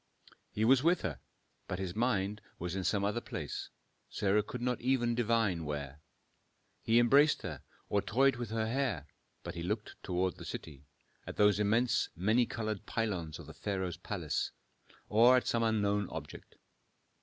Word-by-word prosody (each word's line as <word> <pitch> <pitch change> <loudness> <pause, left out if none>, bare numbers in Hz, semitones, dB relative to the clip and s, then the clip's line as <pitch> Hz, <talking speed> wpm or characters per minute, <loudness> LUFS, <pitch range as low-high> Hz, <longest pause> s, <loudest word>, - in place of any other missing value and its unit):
He 110 - 0
was 130 +2 +6
with 170 +4 +3
her, 90 -5 -3 0.5
but 90 - -3
his 95 -1 -4
mind 105 -3 0 0.2
was 90 +1 -4
in 95 - -2
some 100 +1 +1
other 105 +4 0
place, - - -5 0.4
Sarah 100 +1 +2
could 125 +4 -6
not 125 -1 0
even 120 -2 +2
divine 115 -7 +1
where. 75 -1 -5 0.8
He 115 +1 +3
embraced 140 +5 +5
her, 75 -8 -5 0.3
or 100 - +1
toyed 135 +4 +3
with 120 -3 -4
her 110 0 -1
hair, 115 - -1 0.4
but 85 - -5
he 85 - -6
looked 105 +5 -4
toward 90 -1 -1
the - - -9
city, 70 -3 -8 0.4
at - - -6
those 105 -1 +5
immense 115 +4 +2
many 110 +7 +2
colored 110 -3 -4
pylons 95 -9 -2
of - - -10
the - - -10
pharaoh's 95 -3 -3
palace, - - -2 0.6
or 120 +4 +6
at 125 - 0
some 115 - +1
unknown 105 -3 +1
object. - - -8
105 Hz, 165 wpm, -33 LUFS, 95-120 Hz, 0.8 s, was